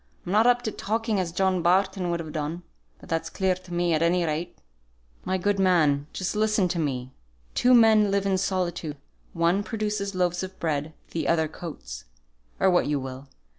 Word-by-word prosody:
I'm 175 Hz, -, -4 dB
not 215 Hz, +4 st, +4 dB
up 245 Hz, 0 st, +3 dB
to 220 Hz, -, -2 dB
talking 220 Hz, 0 st, -1 dB
as 175 Hz, -2 st, -2 dB
John 185 Hz, 0 st, +1 dB
Barton 185 Hz, +1 st, +2 dB
would 170 Hz, 0 st, -1 dB
have 160 Hz, -2 st, -6 dB
done, 155 Hz, +3 st, -4 dB, 0.4 s
but -, -, -14 dB
that's 165 Hz, 0 st, -2 dB
clear 190 Hz, -1 st, +1 dB
to 185 Hz, 0 st, -12 dB
me 175 Hz, -1 st, +1 dB
at 155 Hz, -, +1 dB
any 170 Hz, +1 st, +2 dB
rate." 165 Hz, +3 st, -3 dB, 0.7 s
"My 190 Hz, -, 0 dB
good 200 Hz, +2 st, 0 dB
man, 155 Hz, -7 st, +3 dB
just 185 Hz, +2 st, -3 dB
listen 215 Hz, -3 st, +2 dB
to 170 Hz, -, -2 dB
me. 130 Hz, -4 st, -2 dB, 0.4 s
Two 250 Hz, 0 st, +4 dB
men 220 Hz, -3 st, +6 dB
live 200 Hz, 0 st, 0 dB
in 190 Hz, -1 st, +1 dB
solitude; 175 Hz, -5 st, -2 dB, 0.4 s
one 170 Hz, +4 st, +2 dB
produces 210 Hz, -2 st, -3 dB
loaves 180 Hz, -1 st, 0 dB
of 190 Hz, 0 st, -7 dB
bread, 155 Hz, -1 st, -2 dB, 0.2 s
the 165 Hz, -, -2 dB
other 160 Hz, -1 st, +2 dB
coats, -, -, -8 dB, 0.5 s
or 190 Hz, -1 st, +4 dB
what 175 Hz, -, +3 dB
you 145 Hz, -1 st, 0 dB
will. 130 Hz, +1 st, -7 dB
180 Hz, 190 wpm, -26 LUFS, 160-195 Hz, 0.7 s, men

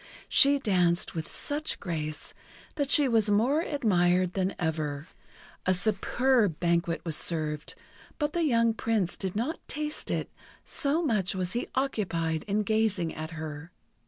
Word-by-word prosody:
She 280 Hz, +1 st, +6 dB
danced 180 Hz, -8 st, +1 dB
with 160 Hz, -1 st, -5 dB
such 300 Hz, +2 st, -1 dB
grace 155 Hz, -4 st, -4 dB, 0.4 s
that 285 Hz, -2 st, -2 dB
she 285 Hz, 0 st, +7 dB
was 225 Hz, -4 st, +2 dB
more 240 Hz, +10 st, +3 dB
admired 185 Hz, -, +1 dB
than 190 Hz, 0 st, -1 dB
ever. 155 Hz, -3 st, -3 dB, 0.6 s
A 185 Hz, -, +4 dB
superb 215 Hz, -, +2 dB
banquet 170 Hz, -1 st, 0 dB
was 160 Hz, -2 st, -1 dB
served, 150 Hz, -3 st, -1 dB, 0.4 s
but 295 Hz, -1 st, -1 dB
the 345 Hz, -, 0 dB
young 230 Hz, -6 st, +3 dB
Prince 220 Hz, -5 st, -1 dB
did 190 Hz, -1 st, -4 dB
not 245 Hz, +10 st, -2 dB
taste 300 Hz, 0 st, -2 dB
it, -, -, -2 dB, 0.3 s
so 300 Hz, +4 st, +1 dB
much 210 Hz, -, 0 dB
was 180 Hz, -1 st, -2 dB
he 240 Hz, -, -2 dB
occupied 170 Hz, -, -1 dB
in 210 Hz, +1 st, 0 dB
gazing 210 Hz, -6 st, 0 dB
at 155 Hz, 0 st, -6 dB
her. 155 Hz, +1 st, -7 dB
195 Hz, 145 wpm, -28 LUFS, 170-250 Hz, 0.6 s, she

